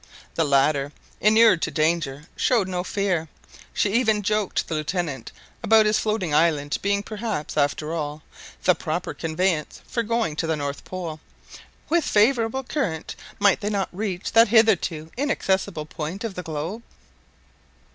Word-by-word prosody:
The 165 - +1
latter, 140 0 +2 0.3
inured 215 -4 +5
to - - 0
danger, 155 -3 0
showed 225 -7 +2
no 180 -1 -2
fear; 185 -5 -1 0.4
she 205 - 0
even 220 -3 +2
joked 210 -1 0
the - - -4
Lieutenant 155 -5 -3 0.3
about 220 -1 +5
his 210 0 +3
floating 210 -8 -1
island 150 -2 +2
being 200 0 0
perhaps, 215 -7 -4
after 150 +2 0
all, 150 -1 -4 0.4
the - - +5
proper - - -3
conveyance 165 -1 -1
for 235 - -2
going 230 -8 -1
to 165 - -1
the 160 - +1
North 145 -1 -5
Pole. 170 -4 -6 0.7
"With 340 0 +2
a - - 0
favourable 230 +3 +2
current 205 - -3 0.2
might 200 -2 +4
they 205 - -1
not 200 -2 -1
reach 190 -1 -3
that 230 +1 +6
hitherto 195 -8 +2
inaccessible 195 - 0
point 160 +5 -5
of 225 -3 -3
the 180 - -5
globe?" 165 +7 -5
185 Hz, 150 wpm, -24 LUFS, 155-215 Hz, 0.7 s, that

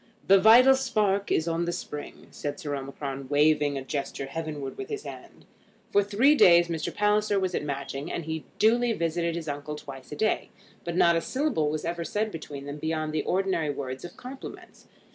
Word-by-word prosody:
"The 195 0 +6
vital 240 +6 +8
spark 215 -7 0
is 160 - +1
on 165 +1 0
the 175 - -1
spring," 150 -3 -7
said 145 +5 -5
Sir 150 -5 -4
Omicron, 135 0 -6
waving 150 -1 +3
a 135 - -4
gesture 140 0 -4
heavenward 145 -1 -5
with 400 - -7
his 425 -1 -4
hand. - - -11 0.5
For 205 - +4
three 215 +9 +4
days 170 - +6
Mr. 165 -2 -2
Palliser 210 0 +2
was 185 -1 -1
at - - 0
Matching, 140 +1 -4
and 170 - -4
he 160 -1 -4
duly 235 +2 +3
visited 170 -2 -1
his 165 -2 -5
uncle 145 +1 -4
twice 135 -3 -10
a - - -4
day. 215 +7 0 0.3
But 170 0 -4
not 170 -1 +5
a 165 - +1
syllable 255 - 0
was 155 0 -3
ever 170 0 -2
said 215 +5 -2
between 145 -4 -7
them 145 +1 -6
beyond 155 0 -2
the 155 - +1
ordinary 185 -4 0
words 135 -2 -5
of 175 - -9
compliments. 260 +2 -10
165 Hz, 195 wpm, -27 LUFS, 145-205 Hz, 0.5 s, vital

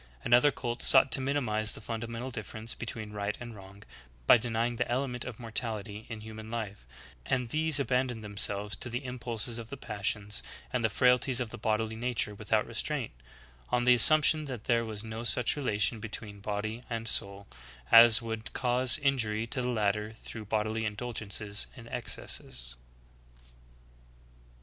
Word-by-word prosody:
Another 125 +4 +5
cult 120 -3 -4
sought 135 -1 +6
to 125 - +6
minimize 115 -6 +1
the - - -5
fundamental 115 +2 -5
differ 110 -2 -7
ence 110 +1 -4
between 110 -2 -5
right 105 0 -3
and 120 -2 -8
wrong, 100 +1 -13 0.4
by - - +8
denying 120 0 0
the 125 0 -1
element 125 -1 -1
of 125 -4 -7
morality 110 -2 -4
in 110 -2 -6
human 110 0 -9
life; 105 - -5 0.4
and 125 - -1
these 155 +1 +2
abandoned 125 -4 0
themselves 100 -1 0
to - - -5
the 120 +3 -4
impulses 120 -2 -2
of 115 -1 -9
the 140 - -7
passions 105 -2 -1 0.3
and 125 -2 0
the 110 - +3
frailties 125 +3 +3
of 120 -3 -3
the 120 - -7
bodily 110 +1 -1
nature 120 -2 -1
without 105 +1 0
restraint, 120 +2 -2 0.6
on 120 0 +1
the 125 0 +6
assumption 155 +5 +6
that 125 -6 -6
there 115 -1 +2
was 110 -1 -5
no 110 +1 -6
such 120 +1 +2
relation 110 -6 0
between 105 -1 -5
body 105 +3 -4
and 115 -1 -4
soul 100 -2 -1 0.5
as 115 0 +8
would 110 -1 -5
cause 125 +1 +3
injury 115 -6 +1
to 125 +3 -2
the 125 - -1
latter 105 -1 0
through 110 -1 -9
bodily 110 +1 -1
indulgences 105 -2 -3
and 115 -1 -11
excesses. 60 - -4
115 Hz, 160 wpm, -30 LUFS, 105-125 Hz, 0.6 s, by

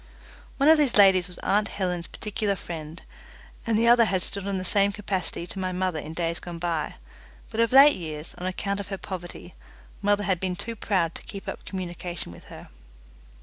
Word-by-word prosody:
One 280 - +3
of 315 0 +7
these 280 -7 +3
ladies 190 -3 +6
was 180 - -8
aunt 205 +1 +2
Helen's 180 -4 -3
particular 210 -1 -2
friend, 165 -2 -8 0.6
and 225 -2 +2
the 230 +1 +3
other 235 -1 +7
had 190 -4 0
stood 200 -1 -5
in 200 -1 -1
the 185 - -4
same 200 +1 +4
capacity 190 -4 -1
to 190 - -7
my 185 -1 -1
mother 180 -3 -1
in 155 +1 -7
days 170 0 -1
gone 175 -1 -7
by, 165 -2 -2 0.6
but 225 - -4
of 230 0 +3
late 275 +3 +8
years, 155 -2 -6
on 180 - -3
account 200 +2 -2
of 200 - -5
her 195 -1 -4
poverty, 180 -2 -7 0.5
mother 205 0 +2
had 190 -4 +1
been 185 -1 -2
too 230 +4 -6
proud 185 -6 0
to - - -6
keep 195 -2 -9
up - - -6
communication 175 - -5
with 85 - -14
her. - - -12
190 Hz, 200 wpm, -26 LUFS, 175-205 Hz, 0.6 s, late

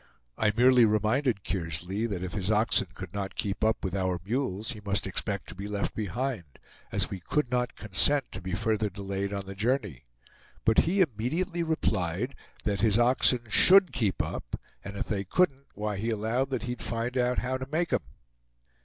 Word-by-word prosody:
I 105 -1 +2
merely 125 0 +6
reminded 110 +1 +2
Kearsley 90 +5 -2
that 95 -5 -4
if 90 - -5
his 100 -2 -1
oxen 110 -2 +3
could 90 -3 -8
not 100 -1 -4
keep 100 -1 -2
up 110 0 +1
with 95 - -2
our 95 -2 0
mules 110 -2 -1
he 110 -4 -7
must 100 -2 0
expect 100 0 -3
to - - -7
be 100 +2 -6
left 105 -1 -2
behind, 110 - -4 0.3
as - - 0
we 95 - -4
could 130 +8 -1
not 125 -1 0
consent 130 +7 +2
to - - -7
be 90 0 -5
further 110 +3 0
delayed 100 0 -4
on 100 -1 -4
the 95 - -7
journey; 105 - -1 0.6
but 110 - +5
he 195 +2 +2
immediately 165 - 0
replied, 110 - -1 0.3
that 100 -2 -1
his 110 -1 +4
oxen 125 0 +4
"SHOULD 185 - +7
keep 110 -7 0
up; - - -5 0.2
and 100 0 -7
if - - -2
they 100 -3 -2
couldn't, 140 - +1
why 105 0 -3
he 110 +4 -2
allowed 115 +5 0
that 130 -4 -2
he'd 125 0 -4
find 115 +2 -2
out 125 0 +1
how 130 +1 -1
to 130 - -5
make 165 +3 0
'em!" - - +2
110 Hz, 190 wpm, -28 LUFS, 100-125 Hz, 0.6 s, SHOULD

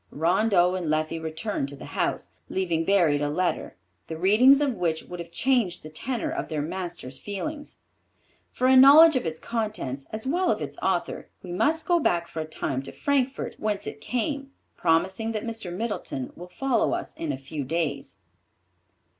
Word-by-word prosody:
Rondeau 180 +3 +3
and 185 -3 -3
Leffie 155 +1 0
returned 160 -1 -3
to 140 - -9
the - - -10
house, - - -1 0.2
leaving 170 -4 0
buried 170 -7 +3
a 145 - 0
letter, 175 - -1 0.3
the 160 - -5
reading 220 - +6
of 285 -3 +1
which 170 -6 -1
would 180 - -9
have 170 0 -7
changed 235 -7 +1
the 155 - -9
tenor 260 - -3
of 345 +2 -3
their 155 -3 -2
master's 170 -6 -5
feelings. 290 - -6 0.7
For 255 - -1
a 260 +1 +6
knowledge 290 +4 +9
of 255 - 0
its 160 0 -4
contents 210 - -3
as 220 +2 -5
well 350 +7 +1
of - - +1
its - - -6
author, - - -1
we 180 - -7
must 310 - +1
go 350 -1 +4
back 170 - +1
for 160 - -7
a 155 - -2
time 135 -4 -3
to 135 - -9
Frankfort 275 -2 -1
whence 210 -2 -2
it - - -7
came, 275 +4 -2 0.2
promising 190 +7 +1
that 215 0 -3
Mr. 225 -6 -5
Middleton 185 - -4
will 175 +1 -10
follow 260 +5 +1
us - - -6
in 160 -3 -3
a 135 - -3
few 140 +2 -6
days. 140 - -3
185 Hz, 180 wpm, -26 LUFS, 160-250 Hz, 0.7 s, knowledge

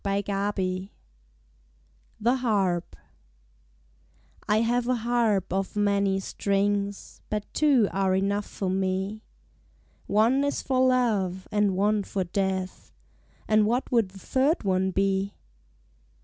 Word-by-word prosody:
Vigils 195 -1 -1 1.3
THE 240 +4 +2
HARP 195 -8 0 1.5
I 215 +1 +3
HAVE 240 +1 +1
a 255 - +2
harp 225 -6 0
of 195 +1 -2
many 200 -1 +1
strings 200 +1 -2
But 210 -1 -2
two 275 -8 +4
are 190 -1 +1
enough 200 +2 0
for 190 -2 -3
me: 190 +2 -1 0.9
One 230 +7 +3
is 285 - -1
for 260 -1 0
love 205 -8 +1
and 205 -3 +1
one 210 +1 +2
for 195 -1 -3
death; 190 0 -3 0.6
And 215 -1 +4
what 245 +4 -1
would 230 -6 +2
the 190 - -14
third 270 - 0
one 190 -1 +1
be? 195 +1 0
200 Hz, 115 wpm, -26 LUFS, 190-225 Hz, 1.5 s, two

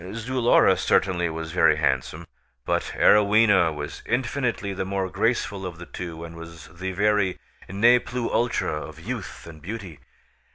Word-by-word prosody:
Zulora 120 +2 +3
certainly 90 -3 +1
was 80 0 -6
very - - +4
handsome, 65 +6 -1 0.4
but - - -1
Arowhena 105 -4 +5
was 75 -1 -7
infinitely 120 -5 -1
the 95 - -3
more 95 -1 -3
graceful 115 -2 -1
of 90 -2 -6
the 85 - -9
two 85 -2 -7
and 85 0 -9
was 85 -1 -11
the 95 +2 -5
very 100 -1 +1 0.3
ne 115 +6 +5
plus 120 -1 -4
ultra 115 -10 0
of 80 0 -10
youth 110 +4 -7
and 80 -2 -12
beauty. 95 -4 -7
95 Hz, 150 wpm, -24 LUFS, 85-115 Hz, 0.4 s, Arowhena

